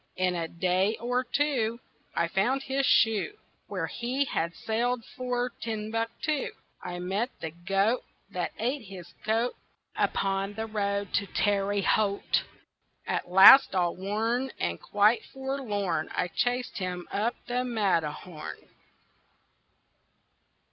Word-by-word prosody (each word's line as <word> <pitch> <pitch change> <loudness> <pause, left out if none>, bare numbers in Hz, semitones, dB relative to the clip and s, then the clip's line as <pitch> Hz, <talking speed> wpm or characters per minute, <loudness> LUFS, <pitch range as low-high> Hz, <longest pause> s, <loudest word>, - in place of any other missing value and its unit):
In 185 -1 +1
a 170 -2 -2
day 185 +5 +1
or 245 +2 0
two 250 -5 0 0.4
I 170 - +2
found 225 +10 +1
his 270 0 0
shoe 225 - +3 0.3
Where - - -2
he 255 +4 -1
had 170 -8 -2
sailed 235 +1 -1
for 250 -1 -1
Timbuktu. 225 +6 -2 0.3
I 175 0 -5
met 195 +7 -1
the 160 - -4
goat 195 +7 +1 0.3
That 180 -2 -2
ate 255 +6 -1
his 180 -3 -10
coat 225 +3 +1 0.4
Upon 195 +1 0
the 220 +1 -3
road 200 -2 -2
to 200 - +1
Terre 200 0 +1
Haute. 200 0 +2 0.6
At - - -2
last 195 +7 +9
all 175 -2 +1
worn 225 +7 -1
And 85 0 -2
quite 210 +3 +3
forlorn 210 - -2
I 180 - 0
chased 245 +3 -1
him 180 -2 -4
up 225 +4 0
the 245 +1 -1
Matterhorn. 180 -8 -2
210 Hz, 120 wpm, -28 LUFS, 185-245 Hz, 0.6 s, last